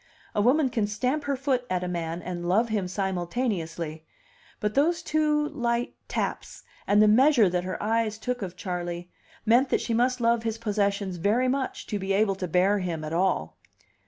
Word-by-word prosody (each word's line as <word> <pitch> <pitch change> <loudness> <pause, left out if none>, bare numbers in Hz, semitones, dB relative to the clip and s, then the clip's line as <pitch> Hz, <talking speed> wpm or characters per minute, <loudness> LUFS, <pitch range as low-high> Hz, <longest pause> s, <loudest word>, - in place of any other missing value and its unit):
A 205 - +1
woman 265 +5 +3
can 225 -4 0
stamp 255 +8 -1
her 280 -1 0
foot 260 -2 0
at 180 -1 -1
a - - -2
man 170 -1 -3
and 175 -1 -4
love 225 +6 +3
him 205 -4 -1
simultaneously; 175 -4 -2 0.6
but 210 0 -1
those 330 +5 +2
two 300 -1 +1
light 240 -4 -1
taps, - - -4 0.2
and 205 +1 +5
the - - +5
measure 245 0 +5
that 180 0 -1
her 185 - -3
eyes 220 0 0
took 250 +2 -3
of 180 -2 -5
Charley, 175 -1 -4 0.3
meant 245 +4 +4
that - - +2
she 235 - -2
must 250 +2 +2
love 235 0 +2
his 225 -1 -2
possessions 200 -4 -1
very 215 +9 +2
much 265 0 -2
to 210 - -3
be 195 0 -1
able 200 0 +3
to 185 -1 -4
bear 185 +4 +3
him 170 -4 -3
at 155 +1 -5
all. 175 - 0
210 Hz, 190 wpm, -26 LUFS, 180-245 Hz, 0.6 s, and